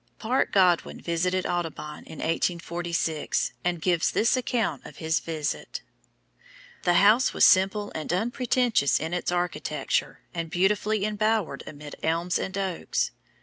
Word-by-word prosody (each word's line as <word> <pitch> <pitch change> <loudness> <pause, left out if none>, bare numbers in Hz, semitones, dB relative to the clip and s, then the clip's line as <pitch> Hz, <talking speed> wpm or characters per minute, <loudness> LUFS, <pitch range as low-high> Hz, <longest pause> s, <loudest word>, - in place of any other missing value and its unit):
Parke 245 +4 0
Godwin 180 -3 +3
visited 180 +2 0
Audubon 160 -3 -4
in 160 - -10
1846, 170 -1 -1
and 175 -1 0
gives 170 0 +2
this 230 +3 +3
account 245 -3 -1
of - - -12
his 160 0 0
visit: 155 -3 -4 1.0
"The 175 -1 +2
house 215 +8 +5
was - - +6
simple 200 +2 +4
and 155 0 -4
unpretentious 235 - +1
in 160 +2 -4
its 180 - -1
architecture, 155 -5 -1
and 165 -2 -4
beautifully 200 +3 +1
embowered 215 -2 0
amid 145 0 -9
elms 170 +2 0
and 190 0 -4
oaks. 190 -3 -1
180 Hz, 130 wpm, -26 LUFS, 165-205 Hz, 1.0 s, was